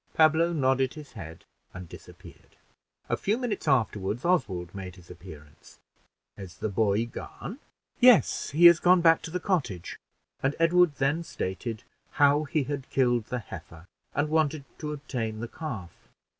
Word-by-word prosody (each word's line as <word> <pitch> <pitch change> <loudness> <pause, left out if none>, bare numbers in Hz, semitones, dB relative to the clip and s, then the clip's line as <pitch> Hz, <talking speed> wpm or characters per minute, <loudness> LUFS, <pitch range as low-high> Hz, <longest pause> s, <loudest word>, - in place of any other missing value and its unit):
Pablo 160 +2 +4
nodded 135 -4 +1
his 150 -2 -11
head 80 -7 -10 0.3
and 90 -1 -8
disappeared. - - -15 0.5
A - - 0
few 210 +3 -1
minutes 240 -9 -3
afterward, 110 - 0
Oswald 95 - 0
made 95 -2 -7
his 90 -1 -15
appearance. 80 -5 -14 0.6
"Is 95 -2 -10
the 110 - -3
boy 105 +2 +1
gone?" 180 - -8 0.4
"Yes; 245 -4 +5
he 165 +5 +3
is 170 -1 +9
gone 180 0 +5
back 165 -1 +5
to - - -7
the 180 +2 -3
cottage;" 145 - -2 0.4
and 135 +2 0
Edward 165 -1 +4
then 140 +5 0
stated 110 - -5 0.3
how 145 +1 +3
he 150 +1 0
had 140 0 -5
killed 120 -4 +1
the 125 - -4
heifer, 85 -6 -10 0.3
and 145 +2 0
wanted 155 -2 0
to 150 -1 -4
obtain 125 -7 -4
the 120 - -4
calf. 115 - -7
135 Hz, 155 wpm, -27 LUFS, 100-160 Hz, 0.6 s, is